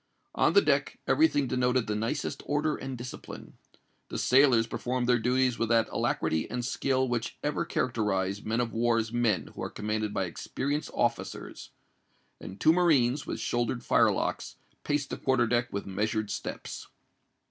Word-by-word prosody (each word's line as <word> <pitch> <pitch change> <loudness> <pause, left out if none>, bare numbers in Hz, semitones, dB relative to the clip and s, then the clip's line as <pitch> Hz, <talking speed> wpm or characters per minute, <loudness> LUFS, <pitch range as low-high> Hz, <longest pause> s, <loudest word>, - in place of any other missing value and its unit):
On - - +3
the 400 - +6
deck - - +1
every 320 - +5
thing 145 - 0
denoted 125 -1 +1
the 105 - -2
nicest 115 +8 -2
order 150 +1 +1
and 135 -1 -6
discipline. 120 +1 -9 0.6
The - - -4
sailors 125 -3 +5
performed 120 +2 -2
their 125 -1 +4
duties 125 +1 +1
with 115 - 0
that 115 -1 +3
alacrity 80 0 0
and 125 0 -3
skill 130 0 0
which 120 -2 -3
ever 150 0 -1
characterise 100 -5 -1
men 115 +3 0
of 120 -2 -3
war's 115 -1 +1
men 115 -7 +1
who - - -8
are - - -3
commanded 105 0 -2
by 95 -2 -1
experienced 140 - -3
officers; - - -2 0.7
and 95 - -9
two 160 - +5
marines, 150 -7 +3
with - - -4
shouldered 120 0 -1
firelocks, - - +1 0.3
paced 145 -1 -1
the - - -3
quarter 130 -2 +2
deck 120 +1 0
with 100 - -4
measured 105 +2 -2
steps. - - -6
120 Hz, 160 wpm, -29 LUFS, 110-130 Hz, 0.7 s, the